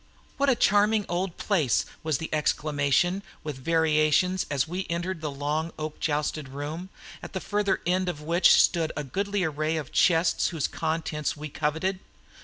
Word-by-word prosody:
"What 280 0 +2
a 260 - +4
charming 210 0 +3
old 175 +1 -2
place," 165 - +1 0.2
was 155 -3 0
the 160 - -6
exclamation 150 +4 +1 0.2
with 150 -3 -5
variations 160 +4 +2
as 145 0 0
we 185 +3 -4
entered 170 0 -3
the 155 - -2
long 150 +4 -2
oak 155 0 -5
joisted 150 -1 -1
room, 150 +7 -6 0.3
at - - -9
the 190 - -2
further 205 +1 0
end 180 +1 +1
of 150 - -4
which 170 +4 +5
stood 165 -3 +3
in 150 -2 -4
goodly 200 +5 -1
array 155 0 -1
the 155 - -2
chests 165 +4 +2
whose 160 -5 -1
contents 155 -2 -2
we 150 +1 -6
coveted. 160 +6 -1
160 Hz, 165 wpm, -27 LUFS, 150-185 Hz, 0.3 s, which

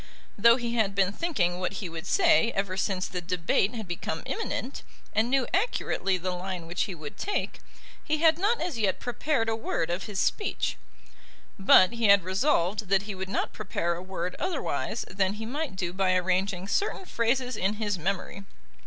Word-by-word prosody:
Though 230 +3 +6
he 240 -2 -3
had 215 -4 +1
been 195 0 +3
thinking 190 - 0
what 185 +1 -2
he 195 -1 -4
would 165 -1 -7
say 320 -11 +4
ever 195 -1 -1
since 190 -1 -1
the 180 - -4
debate 180 +4 0
had 220 -4 -5
become 175 - -4
imminent, 285 - -3 0.3
and 220 +3 +2
knew 265 -1 +2
accurately 365 - +1
the 185 +1 -3
line 180 -1 -4
which 175 +1 -1
he 195 -4 -6
would 150 -3 -9
take, 410 - -2 0.4
he 310 - 0
had 320 +1 +4
not 435 +5 +2
as 330 -9 -3
yet 200 -3 +1
prepared 245 0 -1
a 225 - +1
word 170 -6 -2
of 175 +2 -2
his 205 -3 -4
speech. 415 - 0 0.8
But 190 -1 +7
he 235 -1 -1
had 200 -2 +6
resolved 195 - +1
that 195 0 +3
he 205 0 -5
would 190 0 -5
not - - -1
prepare 175 -4 -2
a 170 - -6
word 185 -1 -4
otherwise 370 - -2
than 190 0 0
he 220 +1 -6
might 285 0 -3
do 180 -2 -3
by 185 -1 +2
arranging 185 +1 0
certain 385 - -1
phrases 250 -1 0
in 195 +3 0
his 205 -3 -2
memory. 195 +2 -3
200 Hz, 190 wpm, -28 LUFS, 185-235 Hz, 0.8 s, But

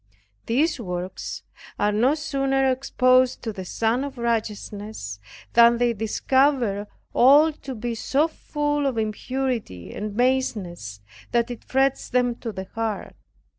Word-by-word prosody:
These 275 +5 +1
works 180 -3 -5 0.3
are 205 0 +2
no 240 +8 +3
sooner 270 -3 +1
exposed 255 -1 +2
to 225 -2 -3
the 190 - -6
Sun 225 +7 0
of 280 -2 -6
Righteousness, 210 - -3 0.3
than 235 0 +7
they 240 0 +2
discover 230 -1 +1 0.3
all 290 +6 +6
to 270 -3 -8
be 235 +1 -3
so 275 +7 +1
full 295 -2 -1
of 260 -4 -2
impurity 225 - -3
and 210 0 -5
baseness, 200 - -1 0.3
that 235 0 +1
it 240 - -8
frets 270 0 +1
them 250 -1 +2
to 230 - -5
the 190 -1 -6
heart. 225 -2 -3
240 Hz, 135 wpm, -24 LUFS, 210-270 Hz, 0.3 s, than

